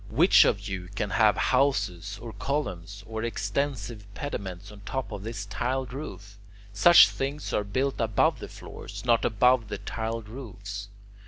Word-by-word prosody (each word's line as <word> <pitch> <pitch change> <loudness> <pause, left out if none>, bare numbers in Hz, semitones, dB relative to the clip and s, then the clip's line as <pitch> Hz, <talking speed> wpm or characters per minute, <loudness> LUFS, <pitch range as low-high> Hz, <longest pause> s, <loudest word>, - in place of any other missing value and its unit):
Which - - +6
of 100 +1 0
you 95 -3 -5
can 105 -1 -2
have 110 -3 +4
houses 100 -8 +1
or 115 -2 -8
columns 100 - -3
or 110 0 -5
extensive 110 -1 -3
pediments 100 -8 -5
on 105 - -12
top 130 +6 -4
of 105 -1 -6
his 110 -3 -5
tiled 125 +4 -2
roof? 100 - -8 0.3
Such 170 +11 +8
things 140 +2 -4
are 105 - +1
built 130 +6 -1
above 110 -3 +2
the - - -7
floors, - - -9
not 120 -2 +3
above 120 +1 +3
the - - -4
tiled 115 -1 -4
roofs. 100 -4 -7
110 Hz, 155 wpm, -27 LUFS, 100-125 Hz, 0.3 s, Such